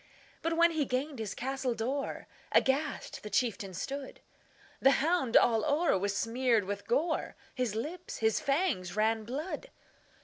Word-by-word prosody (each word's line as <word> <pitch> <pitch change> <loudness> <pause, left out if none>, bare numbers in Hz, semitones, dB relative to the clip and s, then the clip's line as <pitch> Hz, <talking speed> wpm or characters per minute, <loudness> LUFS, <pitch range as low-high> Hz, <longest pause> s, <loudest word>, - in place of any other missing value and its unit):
But, 330 0 -1
when 340 0 +6
he 315 -2 +1
gained 265 +1 -2
his 215 -3 -4
castle 265 -1 -2
door, 265 +6 -3 0.3
Aghast 280 +3 +1
the 210 - -7
chieftain 205 -3 -1
stood; 270 +8 -5 0.6
The 270 - +6
hound 300 -5 +3
all 225 -2 +4
o'er 310 - +2
was 200 +1 0
smeared 235 -1 +2
with 200 +1 -5
gore, 315 +7 0 0.2
His 250 -5 -1
lips, 320 +10 -5
his 220 -1 +2
fangs, 275 - 0
ran 220 +1 +1
blood. 305 - -4
255 Hz, 145 wpm, -31 LUFS, 220-295 Hz, 0.6 s, when